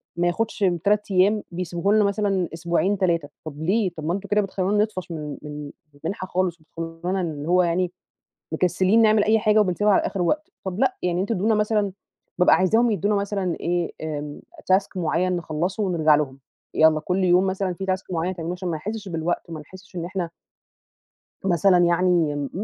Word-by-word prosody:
ما 175 0 +1
ياخدش 220 +7 -1 0.2
3 210 0 +1
أيام 200 +3 +3
بيسبوه 180 +3 -1
لنا 215 - +5
مثلًا 200 -3 0
أسبوعين 170 +4 0
3 170 -6 0 0.2
طب 155 -1 -7
ليه 195 +3 +2
طب 155 - -5
ما 170 - 0
أنتم 200 +1 -5
كده 210 0 +3
بتخلونا 195 +1 +1
نطفش 185 -5 -5
من 150 -3 -5
من 150 -1 -7 0.2
المنحة 175 +6 -5
خالص، 180 -2 -1
وبتخلونا 165 +4 -4
اللي 155 -4 -4
هو 180 0 +4
يعني 175 +1 0 0.6
مكسلين 185 +6 +3
نعمل 215 -1 +4
أي 220 +1 +4
حاجة 215 0 +3
وبنسيبها 205 +1 +2
على - - +4
آخر 190 - -2
وقت، 300 - 0
طب 190 0 -4
لأ، 260 -1 +2
يعني 180 0 0
أنتم 205 +4 -1
ادونا 215 +3 +2
مثلًا 210 -2 +1 0.5
بابقى 180 - +6
عايزاهم 225 +6 +3
يدونا 205 0 +1
مثلًا 200 -3 -1
إيه 175 -1 -1 0.8
task 195 +1 +3
معيّن 180 +1 0
نخلصه 170 +5 -2
ونرجع 165 -6 +3
لهم، 140 -3 -1 0.4
يلا 155 -1 +5
كل 185 +4 0
يوم 180 +1 +4
مثلًا 190 -1 -1
في 190 +2 -6
task 185 0 -1
معيّن 175 +1 -1
تعملوه 170 +1 -4
عشان 180 0 -4
ما 165 - -1
نحسش 210 +5 -5
بالوقت، 170 0 -2
وما 160 -2 -6
نحسش 185 +4 -14
إن 170 - -3
إحنا 180 -2 -3 1.2
مثلًا 180 0 +4
يعني 170 -5 +2
185 Hz, 180 wpm, -23 LUFS, 170-200 Hz, 1.2 s, بابقى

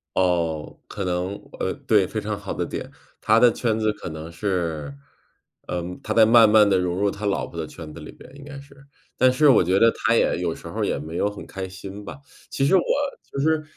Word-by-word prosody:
哦， 85 -4 0
可 100 - -5
能 90 +1 -2 0.3
呃， - - -1
对， 105 -4 +3
非 110 - -3
常 105 0 -4
好 100 -1 -6
的 - - -2
点。 - - -6 0.3
他 110 +1 +4
的 120 0 +6
圈 110 -1 -1
子 110 -1 +1
可 105 - -8
能 80 +1 -8
是 85 -6 -3 0.7
嗯， 90 0 -4
他 110 - -2
在 110 0 +6
慢 115 -1 +7
慢 105 -1 +6
地 95 -2 +3
融 90 -1 -1
入 100 +1 +1
他 105 +2 -6
老 100 -1 0
婆 85 - -9
的 80 - -3
圈 80 -1 -10
子 85 - -10
里 75 - -10
边， - - -15
应 140 - -12
该 140 -1 -9
是。 140 +1 -16 0.4
但 130 0 +5
是 150 +3 +4
我 125 - +6
觉 90 +2 +2
得 115 +2 +5
他 - - 0
也 - - +2
有 - - -2
时 - - -11
候 - - -6
儿 - - +2
也 - - -1
没 80 +3 -6
有 100 - +1
很 105 - -9
开 95 -1 -6
心 95 +2 -9
吧。 85 -8 -9 0.3
其 135 - 0
实 165 - +4
我 185 - +5 0.5
就 - - -4
是， 155 +2 +1
100 Hz, 255 characters per minute, -23 LUFS, 90-110 Hz, 0.7 s, 慢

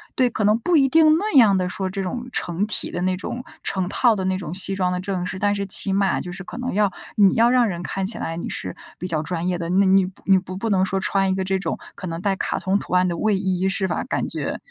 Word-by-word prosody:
对， 255 -1 +3
可 225 - -2
能 210 +2 +4
不 345 +9 +1
一 275 -2 +5
定 315 +2 +5
那 420 +5 -2
样 220 -6 +7
的 180 - 0
说 190 +1 -3
这 195 +1 -4
种 240 +6 -4
成 175 +4 -1
体 215 - -3
的 175 - -3
那 185 0 +1
种、 240 +6 -5 0.2
成 190 -2 -1
套 235 +2 +3
的 190 - -3
那 185 0 0
种 175 -3 -6
西 195 +1 -1
装 185 -1 +1
的 180 - -1
正 185 -2 -3
式， 185 - -5
但 205 +1 +2
是 200 0 -2
起 195 +1 0
码 195 -1 +2
就 180 - -7
是 190 +2 -7
可 - - -8
能 250 +1 -3
要 205 +1 +3 0.3
你 200 -2 +6
要 230 +1 +5
让 245 -1 +4
人 175 -4 -4
看 195 +2 -3
起 215 - -5
来 165 - -4
你 170 - -4
是 - - -5 0.2
比 - - -6
较 160 -4 -1
专 170 0 -3
业 180 -1 0
的， 170 -1 -4
那 190 +3 +3
你 190 0 +5 0.2
你 190 -1 +5
不 185 0 -5
不 225 +4 -2
能 190 -2 +3
说 190 0 -2
穿 195 0 +1
一 190 - +1
个 190 - -1
这 190 0 0
种， 195 - -3 0.2
可 185 - -7
能 165 0 -5
带 195 0 +1
卡 - - -1
通 190 +2 0
图 - - -7
案 180 0 +4
的 170 -1 -2
卫 215 +1 +1
衣 190 -1 0
是 190 0 -1
吧， - - -2
感 - - -1
觉 - - -3
195 Hz, 310 characters per minute, -22 LUFS, 185-210 Hz, 0.3 s, 样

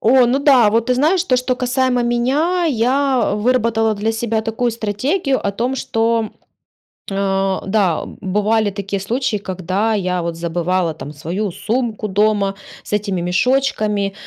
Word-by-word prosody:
О, 250 +2 +5
ну 250 +3 +2
да, 265 -7 +5
вот 230 +1 +1
ты 250 - +2
знаешь, 330 +8 +2
то, 255 -7 +2
что 250 0 -1
касаемо 250 0 +1
меня- 275 +10 +1
я 260 0 +1
выработала 225 -1 +1
для 215 +2 -1
себя 225 -1 -1
такую 225 +2 -1
стратегию 260 - -1
о 200 - +1
том, 240 +6 -2
что 225 -3 0 0.8
а, 195 -1 0
да, 195 -4 +1
бывали 210 +2 0
такие 200 0 -4
случаи, 225 +2 -1
когда 190 +3 -2
я, 180 -3 -1
вот, 170 -1 -3
забывала 170 0 -1
там 150 -1 -8
свою 175 +7 -3
сумку 225 +2 -2
дома 205 -1 +1 0.3
с - - -12
этими 200 -3 -1
мешочками 210 0 0
220 Hz, 145 wpm, -18 LUFS, 195-250 Hz, 0.8 s, О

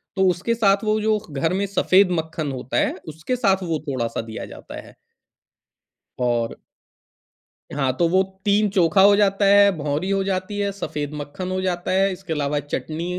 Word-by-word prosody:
तो 190 -1 +3
उसके 180 +6 -1
साथ 200 -2 +2
वो 215 0 +1
जो 215 0 +2
घर 155 +5 -1
में 195 +2 0
सफेद 190 0 +3
मक्खन 160 -2 -4
होता 130 -1 -4
है, - - +1
उसके 160 +10 -3
साथ 195 -6 +1
वो 165 -3 -2
थोड़ा-सा 120 -4 -2
दिया 110 -1 -7
जाता - - -10
है। - - -17 1.2
और 120 -2 0 1.2
हाँ, 135 -3 +1
तो 170 - +3
वो 185 +2 +4 0.2
3 205 +1 +3
चोखा 185 -1 +3
हो 200 +1 +7
जाता 200 0 +2
है, 200 0 +6
भौंरी 150 +5 -2
हो 195 0 +1
जाती 190 +1 -3
है, 200 0 0
सफेद 150 -6 -5
मक्खन 150 +6 -6
हो 185 - -1
जाता 180 -1 -2
है, 195 +1 +2
इसके 180 -3 -5
अलावा 145 -1 -1
चटनी 155 +3 -4
185 Hz, 175 wpm, -22 LUFS, 150-200 Hz, 1.2 s, हो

